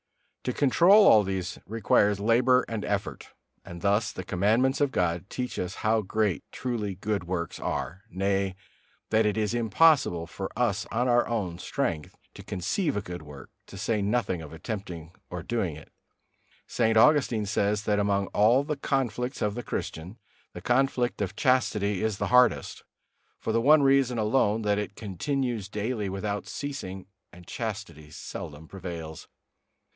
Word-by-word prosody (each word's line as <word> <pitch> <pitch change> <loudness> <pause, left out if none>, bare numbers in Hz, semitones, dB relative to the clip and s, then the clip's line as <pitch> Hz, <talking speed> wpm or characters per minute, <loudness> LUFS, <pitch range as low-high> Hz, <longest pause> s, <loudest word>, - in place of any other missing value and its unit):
To 125 - -1
control 175 - +5
all 110 - +7
these 95 -1 -3
requires 105 -2 +2
labor 120 +4 +3
and 110 -2 -4
effort; 100 -1 -3 0.3
and 85 -1 -9
thus 100 +2 +2
the 95 - -6
Commandments 110 +10 +1
of 140 -2 +2
God 90 -1 -1
teach 125 -1 -4
us 90 +1 -3
how 110 +1 +3
great 105 -4 -1
truly 110 -6 -3
good 100 -1 -2
works 85 -2 -3
are, 95 +4 -3
nay, 95 0 -1 0.6
that 110 0 +4
it 105 - -1
is 110 0 0
impossible 120 - +3
for 95 +3 -6
us 110 -4 0
of - - -18 0.2
our 120 -1 +3
own 95 -7 -2
strength 80 -4 -3 0.2
to - - -11
conceive 105 - -2
a 100 - -2
good 90 -2 -7
work, 75 -3 -12 0.2
to 95 - -11
say 105 +2 0
nothing 100 -4 0
of 75 - -10
attempting 85 -2 -6 0.2
or - - -6
doing - - -2
it. - - -13 0.7
St. 110 -2 +1
Augustine 125 -4 +4
says, 100 +1 0
that 105 -1 +1
among 100 -1 +1
all 115 +6 +4
the 150 0 -3
conflicts 130 -2 -1
of 105 -1 0
the 120 - -4
Christian 90 -1 -5 0.4
the - - -8
conflict 125 -2 +1
of 95 -3 -2
chastity 105 -6 +1
is 110 -3 0
the - - -2
hardest, 125 -1 +3 0.5
for 110 - -3
the 115 - +2
one 145 +3 +6
reason 135 -3 +3
alone, 110 0 +2
that 105 0 +1
it 105 -1 -5
continues 115 - -3
daily 105 0 -2
without 100 +1 -3
ceasing, 115 -10 -6 0.3
and 90 0 -14
chastity 100 -9 -6
seldom 75 +1 -8
prevails. 85 -4 -7
105 Hz, 160 wpm, -27 LUFS, 95-120 Hz, 0.7 s, all